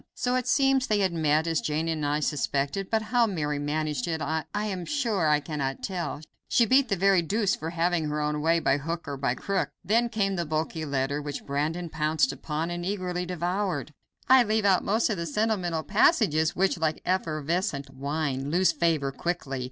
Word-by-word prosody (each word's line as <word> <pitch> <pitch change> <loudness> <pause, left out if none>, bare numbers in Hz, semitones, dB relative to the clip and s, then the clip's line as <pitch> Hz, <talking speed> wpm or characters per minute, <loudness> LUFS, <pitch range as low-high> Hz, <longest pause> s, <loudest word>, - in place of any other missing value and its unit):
So 250 - -1
it 255 -1 -1
seems 270 -1 +3
they 210 - +2
had 190 -3 +1
met, 155 -1 +2
as 165 -2 0
Jane 155 +2 -1
and 160 -2 -2
I 145 +1 0
suspected, 145 +5 -1
but 220 -1 +1
how 235 +2 +2
Mary 150 -7 -2
managed 150 -2 -2
it 160 -1 -1
I 160 0 -2
am 205 -4 -2
sure 225 - 0
I 150 -1 +4
cannot 140 -3 -4
tell; 175 -5 -3 0.3
she 235 - +4
beat 260 +1 +4
the 200 - +2
very 195 0 +4
deuce 200 +4 +1
for 160 - -5
having 170 -1 0
her 150 0 -2
own 150 0 -1
way, 165 +2 +3
by 140 -3 +2
hook 165 +3 -4
or 140 - -3
by 135 -2 -1
crook. 195 +6 -1
Then 230 +6 +2
came 195 -4 0
the 170 - -1
bulky 155 +1 -2
letter, 140 0 -1
which 145 -1 -6
Brandon 155 +5 -2
pounced 160 +8 +1
upon 160 +2 -3
and 175 0 -4
eagerly 180 -2 -2
devoured. 180 -3 -2 0.3
I 260 0 +7
leave 220 -2 +1
out 190 -2 +4
most 220 +3 +1
of 205 - -1
the 170 0 -3
sentimental 180 -3 0
passages, 200 - +3
which, 190 -1 +1
like 160 -1 -1
effervescent 160 -4 -1
wine, 140 0 -2
lose 180 +4 +3
flavor 160 -5 0
quickly. 135 -3 -3
165 Hz, 195 wpm, -27 LUFS, 150-195 Hz, 0.3 s, I